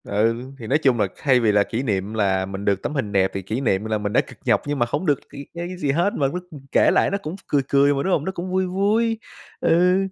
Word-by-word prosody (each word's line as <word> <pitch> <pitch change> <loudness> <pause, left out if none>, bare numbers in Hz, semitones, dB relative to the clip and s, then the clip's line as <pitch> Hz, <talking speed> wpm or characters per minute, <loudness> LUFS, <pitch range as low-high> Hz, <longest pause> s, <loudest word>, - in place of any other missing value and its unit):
Ừ, 110 +3 +1 0.2
thì 115 - -7
nói 140 - +3
chung 130 -6 +2
là 100 - +2
thay 130 -3 +3
vì 115 -3 +3
là 100 0 +4
kỷ 115 +5 -3
niệm 100 -3 -2
là 95 -3 +1
mình 95 +1 -6
được 100 -1 +1
tấm - - -3
hình 110 -8 -2
đẹp 95 -2 +2
thì 95 - -3
kỷ 110 +7 -3
niệm 105 -6 +1
m - - -7
là 110 -1 0
mình 105 0 -3
đã - - +5
cực - - -14
nhọc - - +3
nhưng 145 -1 -2
mà 120 - +3
hổng 145 +8 -2
được 145 -5 +2
c - - -28
cái 140 - -8
cái 175 +2 -5
gì 145 -6 0
hết, 175 +8 +1
mà 140 - +1
lúc 180 +6 -4
mình 140 -3 -11
kể - - +4
lại - - +3
nó 200 - 0
cũng 180 -3 -6
cười 145 - +2
cười 140 +1 +4
mà, 140 0 -1
đúng 190 - 0
hông? 150 - 0
Nó 190 - -1
cũng 180 0 -5
vui 185 0 +1
vui, 215 +5 +1 0.4
ừ, 180 +3 +3
140 Hz, 305 wpm, -22 LUFS, 105-175 Hz, 0.4 s, đã